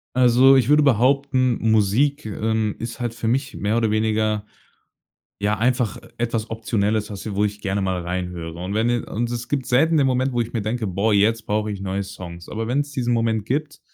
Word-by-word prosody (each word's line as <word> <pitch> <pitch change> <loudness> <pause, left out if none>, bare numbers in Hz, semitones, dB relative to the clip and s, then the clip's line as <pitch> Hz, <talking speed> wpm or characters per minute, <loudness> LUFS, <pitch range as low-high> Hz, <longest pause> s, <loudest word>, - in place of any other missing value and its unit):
Also 130 +2 +6
ich 130 -2 +3
würde 150 +1 +6
behaupten, 130 -1 +2
Musik, 110 +8 +2
ähm, 110 0 -1
ist 115 +2 -6
halt 120 -2 -2
für 115 -1 -4
mich 135 +4 -1
mehr 105 +3 0
oder 115 -2 +1
weniger 110 -1 0 1.0
ja 105 0 0
einfach, 120 -3 +1
äh, - - -13
etwas 115 -1 -2
Optionelles, 110 -1 -1
was 100 0 -6
wo 105 - +1
ich 105 0 -3
gerne 100 0 -1
mal 95 -1 -1
reinhöre. 85 -1 -5
Und 95 +2 -4
wenn 110 +2 +1
je 120 0 +2
Und 120 +2 -3
es 120 0 -5
gibt 140 -3 -1
selten 160 +6 +3
den 140 - +4
Moment, 130 0 +1
wo 120 - 0
ich 115 0 -3
mir 115 -4 -2
denke: 110 +1 -2
„Boah, 100 +4 0
jetzt 110 +2 +2
brauche 105 0 -1
ich 100 - -6
neue 95 +1 -2
Songs.“ 90 -3 -9
Aber 110 +1 -4
wenn's 145 +3 -1
diesen 125 -3 -1
Moment 115 -2 0
gibt, 145 +5 -3
110 Hz, 205 wpm, -22 LUFS, 105-125 Hz, 1.0 s, Also